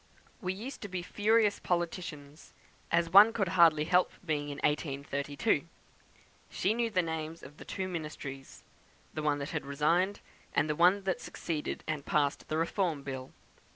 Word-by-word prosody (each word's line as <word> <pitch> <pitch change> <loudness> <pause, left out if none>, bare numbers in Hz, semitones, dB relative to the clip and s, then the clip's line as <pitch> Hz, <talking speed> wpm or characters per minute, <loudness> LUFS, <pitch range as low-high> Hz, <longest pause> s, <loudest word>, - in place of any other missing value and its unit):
"We 185 -3 -1
used 225 +8 -7
to 205 - -5
be 180 -2 -4
furious 210 +2 +2
politicians, 170 -4 -4 0.4
as 170 0 +2
one 205 +4 +9
could 200 -6 0
hardly 165 -4 +5
help 180 +2 +3
being 150 -3 -1
in 145 - -5
1832. 145 +3 0 0.8
She 200 - 0
knew 235 0 0
the 185 -4 +1
names 160 0 -4
of 145 +3 -12
the - - -11
two 190 -1 -3
ministries; 150 -6 -7 0.5
the 155 - -3
one 150 -1 +1
that 140 +2 -5
resigned, 160 +8 +1 0.4
and 145 - +3
the 150 - 0
one 180 +5 +4
that 190 -1 -1
succeeded 155 -3 -4
and 155 -2 -3
passed 145 -1 0
the 155 - -1
Reform 165 -3 0
Bill. 130 -1 -6
165 Hz, 155 wpm, -31 LUFS, 145-185 Hz, 0.8 s, one